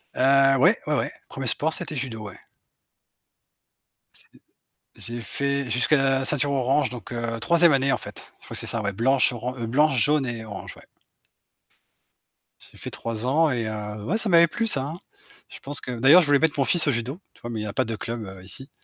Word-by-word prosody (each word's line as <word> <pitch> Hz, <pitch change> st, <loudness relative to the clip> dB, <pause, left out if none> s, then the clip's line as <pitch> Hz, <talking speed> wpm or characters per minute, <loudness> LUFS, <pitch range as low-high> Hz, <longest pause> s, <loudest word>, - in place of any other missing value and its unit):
Heu, 135 Hz, +1 st, +4 dB
ouais, 180 Hz, -, +5 dB
ouais, 150 Hz, -, +1 dB
ouais, -, -, -1 dB, 0.2 s
1er 135 Hz, -, -6 dB
sport, 155 Hz, +6 st, +1 dB
c'était 155 Hz, -, -6 dB
judo, 115 Hz, -6 st, -4 dB
ouais. 95 Hz, -, -14 dB, 1.8 s
C -, -, -12 dB, 0.7 s
j'ai 120 Hz, +1 st, -5 dB
fait 140 Hz, +3 st, -2 dB
jusqu'à 125 Hz, +6 st, +3 dB
la 135 Hz, -1 st, +2 dB
ceinture 145 Hz, +1 st, +1 dB
orange, 135 Hz, 0 st, +1 dB
donc 120 Hz, -2 st, -9 dB
heu, 115 Hz, -1 st, -3 dB
3e 170 Hz, +7 st, +4 dB
année, 135 Hz, 0 st, +2 dB
en -, -, +1 dB
fait, -, -, -11 dB
je -, -, -18 dB
crois -, -, -8 dB
que -, -, 0 dB
c'est -, -, -3 dB
ça, 115 Hz, -, -1 dB
ouais, 100 Hz, -1 st, -2 dB
blanche, 125 Hz, +7 st, +2 dB
oran 125 Hz, +1 st, -5 dB
heu, 120 Hz, -, -4 dB
blanche, 140 Hz, +3 st, +2 dB
jaune 145 Hz, +3 st, +3 dB
et 120 Hz, -2 st, -5 dB
orange, 110 Hz, -2 st, -8 dB
ouais. -, -, -16 dB, 1.9 s
J'ai -, -, -18 dB
fait -, -, -7 dB
3 115 Hz, 0 st, -4 dB
ans 150 Hz, +4 st, +2 dB
et 115 Hz, -3 st, -2 dB
heu, 105 Hz, -1 st, -6 dB
ouais 185 Hz, -, -1 dB
ça 225 Hz, -, -1 dB
m'avait 170 Hz, -1 st, +6 dB
plu 230 Hz, +6 st, -2 dB
ça, 135 Hz, -11 st, +4 dB
hein. 160 Hz, +5 st, -7 dB, 0.5 s
Je -, -, -11 dB
pense 145 Hz, +1 st, -5 dB
que 125 Hz, -2 st, -6 dB
d'ailleurs, 145 Hz, +9 st, +7 dB
je 160 Hz, -, 0 dB
voulais 145 Hz, 0 st, +5 dB
mettre 155 Hz, -2 st, 0 dB
mon 135 Hz, -, +3 dB
fils 170 Hz, -3 st, +3 dB
au -, -, +4 dB
judo, 125 Hz, +6 st, -3 dB
tu -, -, -24 dB
vois? 120 Hz, -, -7 dB
Mais 115 Hz, -2 st, -4 dB
il -, -, -4 dB
y -, -, -4 dB
a 105 Hz, -, -5 dB
pas 130 Hz, -, 0 dB
de 115 Hz, -1 st, -4 dB
club, 115 Hz, +1 st, -5 dB
heu, 95 Hz, -1 st, -11 dB
ici. 115 Hz, +9 st, -8 dB
130 Hz, 225 wpm, -24 LUFS, 115-145 Hz, 1.9 s, d'ailleurs